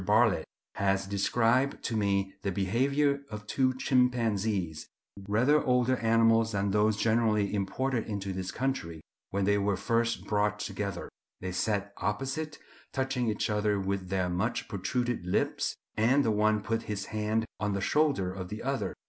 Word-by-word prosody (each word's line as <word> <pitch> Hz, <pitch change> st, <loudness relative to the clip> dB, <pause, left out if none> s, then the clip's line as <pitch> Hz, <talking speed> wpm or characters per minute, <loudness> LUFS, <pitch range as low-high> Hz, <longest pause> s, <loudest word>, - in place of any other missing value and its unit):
Bartlett 105 Hz, +1 st, +3 dB, 0.3 s
has 95 Hz, -1 st, +1 dB
described 115 Hz, +7 st, +1 dB
to 115 Hz, -, -2 dB
me 100 Hz, -2 st, +1 dB
the 100 Hz, -, -1 dB
behaviour 140 Hz, +9 st, +1 dB
of 105 Hz, -1 st, -7 dB
two 130 Hz, +4 st, +2 dB
chimpanzees, 110 Hz, -, +1 dB, 0.4 s
rather 125 Hz, +9 st, +3 dB
older 125 Hz, -1 st, +2 dB
animals 115 Hz, -1 st, +3 dB
than 100 Hz, 0 st, 0 dB
those 105 Hz, +1 st, +2 dB
generally 110 Hz, -2 st, +2 dB
imported 115 Hz, +5 st, -1 dB
into 100 Hz, -3 st, -3 dB
this 95 Hz, 0 st, -4 dB
country, 125 Hz, -12 st, -2 dB, 0.3 s
when 100 Hz, 0 st, 0 dB
they 100 Hz, +1 st, +3 dB
were 100 Hz, -1 st, +1 dB
first 115 Hz, 0 st, 0 dB
brought 105 Hz, 0 st, +1 dB
together. 100 Hz, -1 st, -4 dB, 0.3 s
They 95 Hz, -, -4 dB
sat 100 Hz, +2 st, -1 dB
opposite, 135 Hz, +8 st, -2 dB, 0.3 s
touching 130 Hz, -2 st, -1 dB
each 105 Hz, -, -1 dB
other 105 Hz, -1 st, +1 dB
with 95 Hz, -1 st, -2 dB
their 95 Hz, -1 st, 0 dB
much 90 Hz, +7 st, -1 dB
protruded 120 Hz, 0 st, -2 dB
lips; 90 Hz, -, 0 dB, 0.2 s
and 130 Hz, +6 st, +3 dB
the 110 Hz, -, +3 dB
one 105 Hz, 0 st, +2 dB
put 115 Hz, +1 st, -1 dB
his 100 Hz, -2 st, -2 dB
hand 110 Hz, +1 st, 0 dB
on 105 Hz, -1 st, 0 dB
the 100 Hz, -, -1 dB
shoulder 135 Hz, -9 st, +1 dB
of 95 Hz, -1 st, -6 dB
the 105 Hz, +2 st, -6 dB
other. 135 Hz, +1 st, -2 dB
105 Hz, 155 wpm, -29 LUFS, 100-120 Hz, 0.4 s, Bartlett